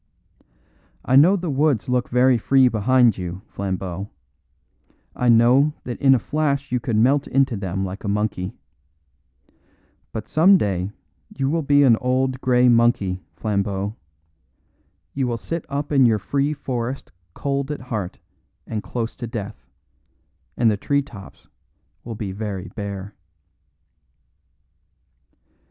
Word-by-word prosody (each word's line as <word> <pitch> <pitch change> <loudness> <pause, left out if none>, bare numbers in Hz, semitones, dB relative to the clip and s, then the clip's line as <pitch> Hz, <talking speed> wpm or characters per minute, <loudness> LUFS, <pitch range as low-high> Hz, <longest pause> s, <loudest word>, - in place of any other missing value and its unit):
I 130 - +2
know 165 +8 +7
the 175 -5 -3
woods 140 -4 +1
look 125 -1 0
very 125 0 +3
free 130 +3 +4
behind 120 -1 +3
you, 90 +2 -6
Flambeau; 95 0 -4 1.1
I 125 - +1
know 125 +6 +5
that 120 -2 -6
in 135 -1 +6
a - - +3
flash 140 +1 -1
you 125 - +1
could 120 -2 -2
melt 135 +6 +3
into 135 -2 +1
them 95 -1 -3
like 95 +1 -7
a - - -4
monkey. 100 -1 -2 1.6
But 110 - -6
some 185 +5 +5
day 95 - -1 0.5
you 135 0 0
will 165 +1 +1
be 145 -1 +4
an 120 -5 +5
old 130 +1 0
grey 125 -1 +3
monkey, 115 -6 +2
Flambeau. 100 -1 -2 1.2
You 135 -2 -1
will 120 -1 -2
sit 165 +7 -5
up 145 +2 -3
in 135 -4 +5
your 110 -2 +3
free 140 +7 -1
forest 130 -3 -4 0.2
cold 140 0 -2
at 150 - -4
heart 110 -8 -4 0.5
and 110 -2 -4
close 115 0 -4
to 120 - -5
death, 110 -2 -7 0.9
and 115 -2 +4
the 105 - -1
tree 140 +7 0
tops 105 -8 -13 0.6
will 115 -1 -6
be 105 -2 -5
very 100 -2 -5
bare." 100 -2 -6
120 Hz, 135 wpm, -22 LUFS, 105-135 Hz, 1.6 s, know